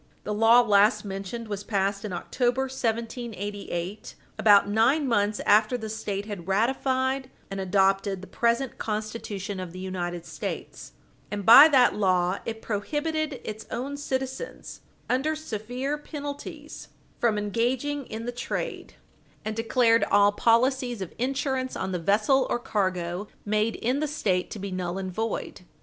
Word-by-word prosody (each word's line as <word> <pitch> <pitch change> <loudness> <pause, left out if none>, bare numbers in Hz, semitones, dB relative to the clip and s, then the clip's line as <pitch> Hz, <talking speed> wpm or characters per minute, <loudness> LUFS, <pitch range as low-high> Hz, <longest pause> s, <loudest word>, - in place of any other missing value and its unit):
The 210 - -3
law 225 +3 +6
last 210 -1 +4
mentioned 195 +4 -5
was 205 -1 -4
passed 200 -1 -1
in 210 - -4
October, 245 +8 0
1788, 220 -6 -4 0.2
about 205 -2 +6
nine 240 +8 +3
months 210 -3 +1
after 215 +4 +4
the 220 -2 -6
State 205 -2 -3
had 200 -5 -7
ratified 260 +5 0 0.2
and 195 - -4
adopted 195 +1 +2
the - - -8
present 235 +3 0
Constitution 210 -2 -4
of 180 -2 -6
the - - -9
United 175 -2 -4
States, - - -6 0.4
and, 205 -2 -4
by 270 +8 +11
that 265 -5 +5
law, 185 -2 +1
it 225 -1 -5
prohibited 295 +6 -2
its 215 0 -7
own 270 +4 -4
citizens, 265 - -5 0.3
under 285 +5 +1
severe 260 +1 -4
penalties, 290 -1 -7 0.3
from 225 -3 +2
engaging 245 +7 -1
in 225 +1 -6
the 245 - -2
trade, 245 - -5 0.5
and 215 0 -2
declared 230 0 +3
all 205 0 +5
policies 240 +1 +2
of 180 - -9
insurance 265 0 -1
on 190 - -3
the 180 - -2
vessel 215 - +3
or - - +1
cargo 185 -4 -2 0.2
made 215 +2 +1
in 250 +4 0
the 305 - 0
State 190 -11 0
to - - -6
be 200 -1 -5
null 180 0 -3
and 190 -1 -4
void. 220 -1 -3
220 Hz, 145 wpm, -26 LUFS, 200-255 Hz, 0.5 s, by